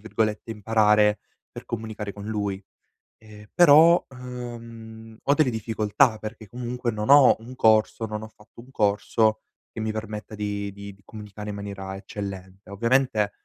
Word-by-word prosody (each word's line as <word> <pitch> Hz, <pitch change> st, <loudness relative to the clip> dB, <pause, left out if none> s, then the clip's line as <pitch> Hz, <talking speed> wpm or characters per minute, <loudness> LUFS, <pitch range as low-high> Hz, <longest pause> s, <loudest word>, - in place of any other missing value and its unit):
virgolette, 110 Hz, +1 st, -2 dB
imparare 105 Hz, -1 st, +3 dB, 0.3 s
per -, -, -10 dB
comunicare 110 Hz, -2 st, -5 dB
con 100 Hz, -, -9 dB
lui, 100 Hz, -3 st, -3 dB, 0.5 s
ehm, 105 Hz, -1 st, -15 dB
però, 170 Hz, +1 st, +7 dB
uhm, 115 Hz, -3 st, -9 dB
ho 140 Hz, -, +3 dB
delle 145 Hz, -2 st, +3 dB
difficoltà 110 Hz, +1 st, +1 dB
perché 110 Hz, 0 st, -8 dB
comunque 120 Hz, +1 st, -4 dB
non 105 Hz, 0 st, -4 dB
ho 140 Hz, -2 st, +8 dB
un 120 Hz, +3 st, -11 dB
corso 110 Hz, -1 st, +3 dB
non 105 Hz, -1 st, -5 dB
ho 110 Hz, -, -7 dB
fatto 110 Hz, +1 st, -17 dB
un 125 Hz, -, -17 dB
corso 110 Hz, 0 st, +1 dB, 0.3 s
che -, -, -7 dB
mi 110 Hz, 0 st, -1 dB
permetta 110 Hz, 0 st, -6 dB
di 100 Hz, -1 st, -3 dB
di 100 Hz, 0 st, -10 dB
di 100 Hz, -, -24 dB
comunicare 105 Hz, -1 st, -9 dB
in 105 Hz, -, -5 dB
maniera 100 Hz, -1 st, -6 dB
eccellente. 95 Hz, -1 st, -8 dB
Ovviamente, 115 Hz, 0 st, +1 dB
110 Hz, 150 wpm, -25 LUFS, 105-115 Hz, 0.5 s, ho